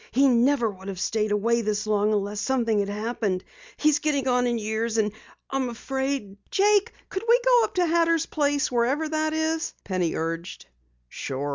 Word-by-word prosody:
He 275 +3 +4
never 250 0 +3
would 190 0 -13
have 195 -2 -5
stayed 215 +1 0
away 230 +3 +2
this 215 -1 -1
long 210 0 +2
unless 205 0 -1
something 235 -5 +1
had 200 0 -1
happened. 210 -3 -2 0.3
He's 300 -1 +3
getting 285 -3 0
on 250 -1 +2
in 240 -1 0
years 220 +1 -2
and 210 -1 +2 0.4
I'm 270 -2 0
afraid 265 -3 -3
" - - -37
"Jake, 415 +2 +3 0.2
couldn't 410 +4 -4
we 480 +1 +6
go - - +5
up 435 - -10
to 360 -1 +3
Hatter's 335 -1 +2
place, 290 -2 0
wherever 250 +6 +1
it 310 0 -1
is?" 315 +1 -1
Penny 185 -4 -1
urged. 165 +2 -4 0.4
"Sure. 135 - -4
240 Hz, 180 wpm, -25 LUFS, 210-305 Hz, 0.4 s, we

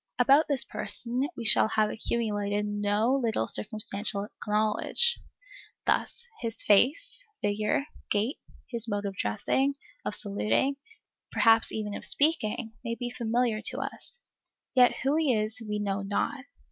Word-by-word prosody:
About 275 +5 +5
this 275 -3 +4
person 250 +3 -1
we 235 - -5
shall 220 - +5
have 215 -1 +1
accumulated 210 -3 -1
no 205 +3 0
little 220 - 0
circumstantial 200 - 0 0.2
knowledge; 215 - +2 0.7
thus, 475 - -1
his 230 -2 -3
face, 275 - +3 0.2
figure, 210 +6 0 0.2
gait, 215 +7 0 0.3
his 235 -2 -2
mode 205 -1 -2
of 195 -1 -4
dressing, 265 - 0 0.3
of - - -2
saluting, 215 +6 +1 0.5
perhaps 225 -1 +4
even 210 -2 -4
of - - -6
speaking, 245 -7 0
may 230 -1 -3
be 245 0 -5
familiar 235 -2 0
to 250 +4 -2
us; 275 - -7 0.5
yet 250 -1 +5
who 280 +3 +2
he 300 -7 +2
is 215 +2 -2
we 210 -1 -3
know 200 -1 -2
not. 230 +7 -2
225 Hz, 135 wpm, -28 LUFS, 205-260 Hz, 0.7 s, About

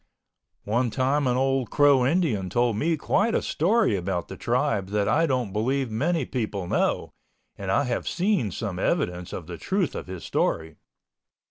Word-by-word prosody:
One 120 +4 +1
time 135 +4 +1
an 125 0 +2
old 135 -1 +1
Crow 145 -3 +4
Indian 135 - +1
told 120 +2 +1
me 160 +9 +1
quite 210 +9 +1
a - - +2
story 200 - +2
about 90 -1 -3
the - - -6
Tribe 120 -5 0
that 100 0 0
I 165 +8 +3
don't 125 -8 -1
believe 130 +3 0
many 150 +6 0
people 105 -7 -3
know - - 0 0.4
(and 100 -1 -6
I 100 +9 +3
have 125 -3 -2
seen 180 - +1
some - - -4
evidence 90 0 -1
of 85 - -6
the 85 0 -8
truth 190 -4 -1
of - - -6
his 90 -4 -7
story). 80 +2 -1
125 Hz, 170 wpm, -25 LUFS, 100-145 Hz, 0.4 s, Crow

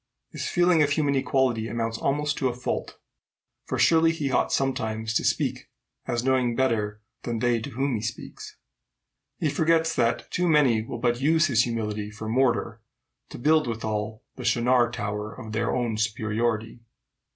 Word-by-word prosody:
His - - -4
feeling 175 -2 +3
of 145 - +3
human 145 -1 +1
equality 130 -4 +1
amounts 115 0 -3
almost 145 +1 0
to 130 - +1
a 120 - -2
fault; 125 - -4 0.7
for - - -3
surely 165 0 +4
he 150 -4 -2
ought 125 - +1
sometimes 110 -5 -1
to - - +1
speak - - -1 0.4
as 120 0 -1
knowing 130 -2 +2
better 105 -5 0 0.2
than 120 -1 -3
they 120 0 +1
to 140 - -6
whom 135 +2 -1
he 110 - -2
speaks. 110 0 -7 0.8
He - - 0
forgets 165 +2 +2
that 115 -1 0
too 180 0 +1
many 135 -8 +4
will 115 - -6
but 120 +1 0
use 160 +3 +4
his 120 -5 +3
humility 105 -3 -3
for 110 0 -8
mortar 115 -2 +1 0.5
to - - -8
build 155 +3 +3
withal 110 0 -3
the - - -7
Shinar 120 0 +3
tower 105 -2 -4
of 110 - -8
their 115 +1 0
own 120 -3 -1
superiority." 110 +1 -1
120 Hz, 165 wpm, -26 LUFS, 110-140 Hz, 0.8 s, surely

